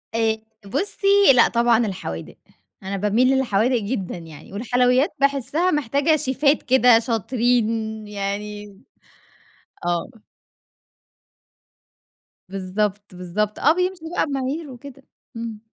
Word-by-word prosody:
آآ 225 -1 +1 0.3
بُصّي، 365 - -2 0.3
لأ 240 -2 +6
طبعًا 235 -1 +2
الحوادق. 80 - -6 0.5
أنا 195 +1 -3
باميل 210 +6 +2
للحوادق 245 -1 +1
جدًا 200 -4 -4
يعني، 165 0 -12
والحلويات 250 - +2
باحسِّها 280 +6 +1
محتاجة 290 +2 +1
شيفات 280 +1 +1
كده 250 -2 +5
شاطرين 225 -2 -1
يعني 205 0 -5 1.1
آه. 175 +6 -3 2.3
بالضبط، 195 +1 -3
بالضبط. 195 +4 -3
آه، 305 - +4
بيمشوا 360 -2 -2
بقى - - +2
بمعايير 275 +2 -3
وكده، 275 +2 -12 0.3
إمم. 230 -2 -6
230 Hz, 100 wpm, -22 LUFS, 205-265 Hz, 2.3 s, لأ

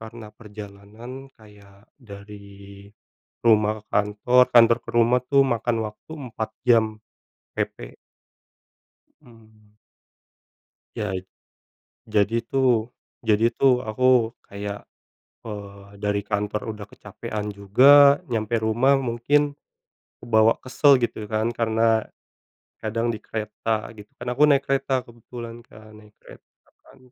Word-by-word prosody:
Karena 110 -1 -11
perjalanan 110 +5 -11
kayak 105 -2 -19 0.2
dari 100 -2 -13 0.6
rumah 110 -1 +3
ke - - -30
kantor, 105 +5 +3
kantor 115 0 +6
ke - - -7
rumah 120 +2 +4
itu 140 +1 +1
makan 120 -1 -1
waktu 105 +9 -12 0.2
4 110 -1 -5 0.2
jam 115 -2 +5 0.7
PP. - - -5 1.3
Mhm. 110 -4 -21 1.2
Yait 95 -3 -3 0.9
jadi, 110 +2 +1
tuh 120 -2 +1 0.3
jadi, 115 +1 +2
tuh, 125 -2 +2
aku 120 +1 +2 0.2
kayak, 100 0 -6 0.6
eee, 100 -2 -9
dari 105 0 -1
kantor 105 0 -3
udah 100 - -9
kecapekan 105 -1 -7
juga, 135 +8 +6
nyampe 110 0 -2
rumah 120 +5 +2
mungkin 140 +4 0 0.6
kebawa 110 -1 +3
kesel 135 +1 +3
gitu, 110 -3 -4
kan, 110 +2 -1
karena, 115 -1 +1 0.8
kadang 115 +2 -1
di 110 - -8
kereta 110 0 -4
gitu, 105 -1 -13
kan, 120 - -9
aku 130 +4 -1
naik 140 -1 +3
kereta 135 -2 0
kebetulan, 120 0 -10
kan. 110 -2 -16
Naik 105 0 -21
kereta, - - -17 0.3
kan, 135 - -20
110 Hz, 115 wpm, -23 LUFS, 105-120 Hz, 1.3 s, kantor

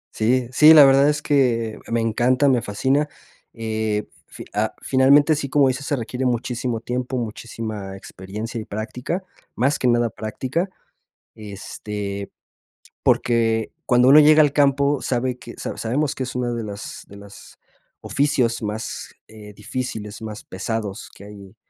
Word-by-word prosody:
Sí, 120 +3 +1
sí, 155 +5 +8
la 150 -2 +10
verdad 135 +1 +5
es 150 0 -1
que 115 -6 +1
me 115 0 0
encanta, 120 +5 +2
me 125 -4 +3
fascina. 135 +9 0 0.4
Eh, 110 -2 -2 0.2
f - - -10
fi - - -17
ah, - - 0
finalmente, 140 +4 +5
sí, 140 -2 -4
como 140 -2 +4
dices, 130 +2 -4
se 145 - +1
requiere 125 +1 -4
muchísimo 120 -1 -2
tiempo, 125 +2 -3
muchísima 110 -3 -6
experiencia 105 +5 -7
y - - -9
práctica, 125 - -4 0.3
más 135 +5 +1
que 125 - +1
nada 120 -2 +2
práctica. 130 - -3 0.7
Este, 100 -1 -6 0.7
porque 115 -2 +1
cuando 125 +1 +4
uno 145 +3 +9
llega 155 +1 +7
al 145 -2 +3
campo, 140 0 +2
sabe 125 0 -1
que 120 - -11
sa - - -5
sabemos 135 +5 -1
que 130 - -3
es 130 - -6
una 125 -1 -1
de 115 -2 -3
las 100 -1 -8
de 100 - -13
las 100 0 -14 0.4
oficios 135 -5 0
más, 105 +1 -5 0.2
eh, 105 -1 -12
difíciles, 105 -1 -6
más 110 -1 -7
pesados 105 +2 -4
que - - -13
hay 100 0 -12
120 Hz, 155 wpm, -22 LUFS, 110-135 Hz, 0.7 s, la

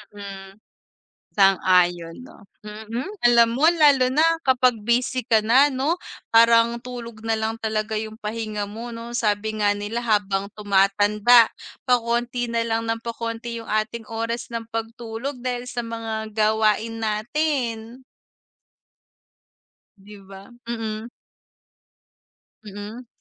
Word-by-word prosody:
Mm. 195 -1 -9 0.8
Sang-ayon 180 -3 +3
'no. - - -16 0.2
Mm, 220 +5 -6 0.2
alam 235 -1 +5
mo 305 +6 +4
lalo 290 -6 +4
na, 300 +5 +3 0.2
kapag 255 -1 +4
busy 245 +3 0
ka 225 -1 +3
na 265 +6 +5
'no? 285 +7 -1 0.3
Parang 230 +1 +5
tulog 235 -3 -8
nalang 225 0 -2
talaga 215 0 -2
yung 220 0 -7
pahinga 215 -1 -4
mo 225 +4 -8
'no, 235 0 -8
sabi 215 -2 0
nga 205 0 +3
nila 210 +3 -4
habang 200 -3 0
tumatanda, 205 +3 +4 0.4
pa-konti 240 0 0
nalang 230 -1 -1
ng 225 0 -2
pa-konti 230 0 -5
yung 225 - -12
ating 215 +1 -2
oras 230 +2 -4
ng 230 -1 -5
pagtulog 230 +3 -5
dahil 250 0 -4
sa 240 -1 -4
mga 220 -1 -5
gawain 220 +1 +1
natin. 240 +1 -2 1.9
'Di 205 +1 -14
ba? 195 +2 -13 0.2
Mm. 225 -1 -4 1.6
Mm. 210 +4 -9
225 Hz, 115 wpm, -23 LUFS, 210-240 Hz, 1.9 s, alam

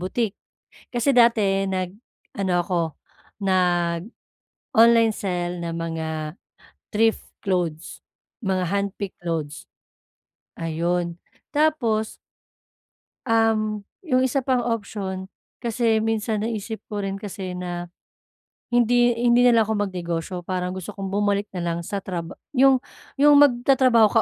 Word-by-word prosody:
boutique. 200 +3 -2 0.6
Kasi 245 +3 +2
dati 210 -5 +4
nag-ano 190 0 -4
ako, 175 -1 0 0.6
nag-online 195 - +1
sell 175 -2 -3
ng 170 - -3
mga 165 -1 -3 0.9
thrift 225 +1 +2 0.2
clothes, 175 -5 -2 0.4
mga 185 -1 +1
handpick 200 0 -2
clothes. 160 -4 -4 0.9
Ayun. 170 +1 -2 0.3
Tapos 245 -8 +1 1.1
um, 215 -2 +1 0.2
'yung 275 -8 +1
isa 265 +1 0
pang 255 -1 +1
option 195 -4 -3 0.3
kasi 230 -2 +1
minsan 220 -1 -1
naisip 220 0 -4
ko 210 - -3
rin 195 -1 -2
kasi 195 -2 -6
na 175 -1 -4 0.8
hindi 240 0 +3
hindi 240 +1 +4
na 245 -1 +6
lang 225 - +6
ako 220 - -1 0.2
magnegosyo 175 -1 -4
parang 180 -1 -2
gusto 190 +2 -6
kong 195 -1 -5
bumalik 205 0 0
na 175 -2 -4
lang 170 0 -1
sa 200 +4 -4
traba 175 -4 -5 0.2
'yung 270 0 +6 0.4
'yung 290 +1 +6
magtatrabaho 255 -3 +5
ka 225 - +5
200 Hz, 115 wpm, -23 LUFS, 180-230 Hz, 1.1 s, na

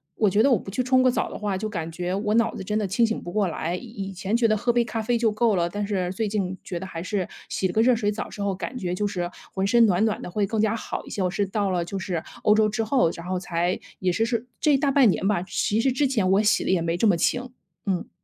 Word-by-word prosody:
我 210 -3 +3
觉 210 +4 +3
得 275 - +4
我 225 - +4
不 - - -9
去 250 +6 -1
冲 255 0 +4
个 255 - +5
澡 - - -1
的 - - -6
话 205 -2 -1
就 215 +2 -3
感 165 -5 -4
觉 180 +2 -3
我 210 +2 0
脑 230 0 +2
子 - - -6
真 210 +3 -1
的 210 - 0
清 230 +5 +2
醒 225 - -3
不 175 - -7
过 205 -1 +1
来。 170 +1 -2
以 - - -10
以 195 -4 -6
前 195 +4 -2
觉 235 -1 +3
得 215 - +3
喝 240 +4 +1
杯 240 -1 +3
咖 225 -1 -3
啡 235 +2 +1
就 225 -2 +2
够 215 -1 +2
了， 170 -1 +1
但 205 +2 -3
是 185 -3 -1
最 220 +2 -1
近 190 -3 -2
觉 175 - -5
得 190 - -6
还 165 -3 -6
是 185 0 -2 0.2
洗 190 - -1
了 180 - -5
个 220 - +3
热 245 +1 +5
水 210 -2 0
澡 210 - -4
之 205 - -8
后 200 -1 0
感 250 - -5
觉 180 -5 -2
就 205 +3 0
是 175 -3 -3 0.2
浑 190 0 0
身 235 +3 +5
暖 195 0 +2
暖 220 -2 0
的 - - -6
会 200 +3 0
更 220 +2 -2
加 220 +1 +2
好 - - -5
一 - - -11
些， 200 - -3
我 180 - +1
是 200 +1 0
到 200 0 -1
了 175 -2 0
就 195 - -5
是 175 -4 -2 0.2
欧 210 - +5
洲 215 0 +4
之 215 +2 -1
后， 235 -6 +2
然 170 - -9
后 185 -1 -1
才 175 0 -1 0.2
也 185 -1 +1
是 225 +6 +1
是 235 +1 -2
这 300 -2 +4
大 280 0 +1
半 265 -5 +5
年 190 - 0
吧， 200 -5 +1
其 205 +3 0
实 265 +2 +2
之 280 +3 +1
前 215 -8 +1
我 200 +2 +4
洗 225 +3 +3
得 - - -1
也 180 -3 +2
没 165 +1 -1
这 220 - +3
么 190 - +4
勤， 250 +9 0 0.4
嗯。 190 -3 -1
205 Hz, 330 characters per minute, -25 LUFS, 185-225 Hz, 0.4 s, 个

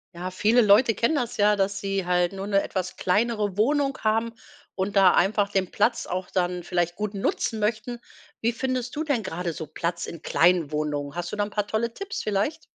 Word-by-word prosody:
Ja, 180 +2 -5
viele 220 +6 +3
Leute 220 +2 +5
kennen 235 +10 +1
das 245 -5 -2
ja, 210 0 +4
dass 195 0 0
sie 195 -1 -2
halt 180 -1 +2
nur 195 0 -6
'ne 200 -1 +2
etwas 185 -1 -4
kleinere 210 0 0
Wohnung 275 +5 +2
haben 225 +1 +1 0.4
und 195 +1 -3
da 190 -2 +6
einfach 200 +2 +2
den 190 -2 0
Platz 230 +3 +1
auch 185 0 -3
dann 180 -1 -1
vielleicht 175 -1 -1
gut 210 +1 -3
nutzen 215 +3 -1
möchten. 220 +3 -2 0.4
Wie 235 +1 0
findest 255 0 -3
du 305 - -1
denn 285 -7 0
grade 180 -3 -3
so 160 -1 -7
Platz 170 +3 -3
in 170 - -8
kleinen 170 -3 +3
Wohnungen? 150 -2 -2
Hast 175 0 -4
du - - -1
da 205 - 0
'n 205 - -4
paar 210 0 -2
tolle 225 +2 -1
Tipps 395 - -5
vielleicht? 215 +11 -1
200 Hz, 205 wpm, -25 LUFS, 180-230 Hz, 0.4 s, da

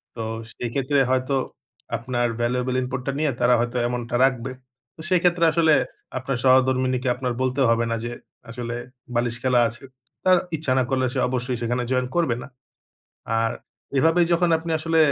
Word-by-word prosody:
তো 115 - -4 0.3
সেই 120 - -5
ক্ষেত্রে 140 +1 +1
হয়তো 130 +1 +1 0.6
আপনার 120 +1 -1
valuable 125 +1 0
input 130 0 -3
টা 135 - +2
নিয়ে 150 -2 +2
তারা 125 - +4
হয়তো 120 +1 -1
এমনটা 120 -1 -3
রাখবে। 130 -1 -1 0.4
তো - - -29
সেইক্ষেত্রে 175 -1 +3
আসলে 160 -1 +4 0.4
আপনার 130 0 -2
সহধর্মিনীকে 130 0 +3
আপনার 125 -1 -2
বলতে 130 +1 0
হবে 115 0 +2
না - - +1
যে 120 - -3 0.4
আসলে 120 0 -5 0.4
বালিশ 120 0 0
খেলা 125 -1 +3
আছে। 120 +4 -12 0.4
তার 185 -1 +6 0.2
ইচ্ছা 150 -3 -2
না 130 - +3
করলে 130 -1 +1
সে 135 - -1
অবশ্যই 125 0 -2
সেখানে 120 +1 -1
জয়েন 125 0 +1
করবে 165 -9 +2
না। - - -9 0.9
আর 115 0 +1 0.5
এভাবে 165 +5 +4
যখন 170 +1 +3
আপনি 165 +1 -6
আসলে 165 +1 0
130 Hz, 165 wpm, -23 LUFS, 120-140 Hz, 0.9 s, তার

